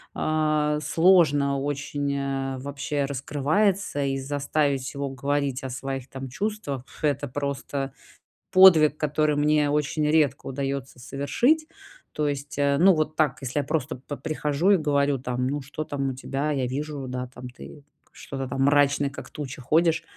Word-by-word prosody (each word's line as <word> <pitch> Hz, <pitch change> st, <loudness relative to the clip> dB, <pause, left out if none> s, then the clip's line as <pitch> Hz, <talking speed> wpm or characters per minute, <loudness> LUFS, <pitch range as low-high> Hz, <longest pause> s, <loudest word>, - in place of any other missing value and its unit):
э, 155 Hz, -1 st, +1 dB
сложно 150 Hz, -4 st, +4 dB
очень, 145 Hz, 0 st, -2 dB
э, 135 Hz, -1 st, -2 dB
вообще 140 Hz, +1 st, -2 dB
раскрывается, 145 Hz, +5 st, 0 dB
и 135 Hz, 0 st, -1 dB
заставить 140 Hz, -1 st, -1 dB
его 140 Hz, 0 st, -3 dB
говорить 140 Hz, 0 st, -1 dB
о 130 Hz, -, -4 dB
своих, 135 Hz, +1 st, -5 dB
там, 135 Hz, 0 st, -7 dB
чувствах- 190 Hz, -, -3 dB, 0.2 s
это 145 Hz, -1 st, 0 dB
просто 140 Hz, 0 st, -3 dB, 0.6 s
подвиг, 165 Hz, -5 st, +7 dB
который 150 Hz, 0 st, +1 dB
мне 150 Hz, 0 st, +3 dB
очень 150 Hz, +1 st, 0 dB
редко 150 Hz, -3 st, +2 dB
удаётся 135 Hz, -1 st, -4 dB
совершить. 240 Hz, -, +1 dB, 0.5 s
То 150 Hz, -1 st, 0 dB
есть, 140 Hz, 0 st, -4 dB
э, 140 Hz, 0 st, +2 dB
ну, 190 Hz, 0 st, +6 dB
вот 155 Hz, 0 st, -1 dB
так, 145 Hz, -5 st, +1 dB
если 135 Hz, +3 st, -2 dB
я -, -, 0 dB
просто 155 Hz, 0 st, -2 dB
по 140 Hz, +3 st, -8 dB
прихожу 155 Hz, +3 st, 0 dB
и 195 Hz, -, +6 dB
говорю, 145 Hz, -3 st, +1 dB
там: 125 Hz, 0 st, -2 dB
"Ну, 145 Hz, +2 st, -1 dB
что 145 Hz, +3 st, -5 dB
там 140 Hz, -2 st, -2 dB
у 130 Hz, -, -4 dB
тебя?" 140 Hz, +3 st, -3 dB
Я 135 Hz, -3 st, 0 dB
вижу, 140 Hz, +1 st, -4 dB
да, 125 Hz, 0 st, -4 dB
там: 125 Hz, 0 st, -10 dB
"Ты 140 Hz, +3 st, -12 dB, 0.3 s
что-то 135 Hz, -1 st, -6 dB
там 135 Hz, +1 st, -1 dB
мрачный, 145 Hz, 0 st, +3 dB
как -, -, -9 dB
туча 135 Hz, -3 st, -7 dB
ходишь, 160 Hz, +5 st, +2 dB
145 Hz, 160 wpm, -25 LUFS, 135-150 Hz, 0.6 s, подвиг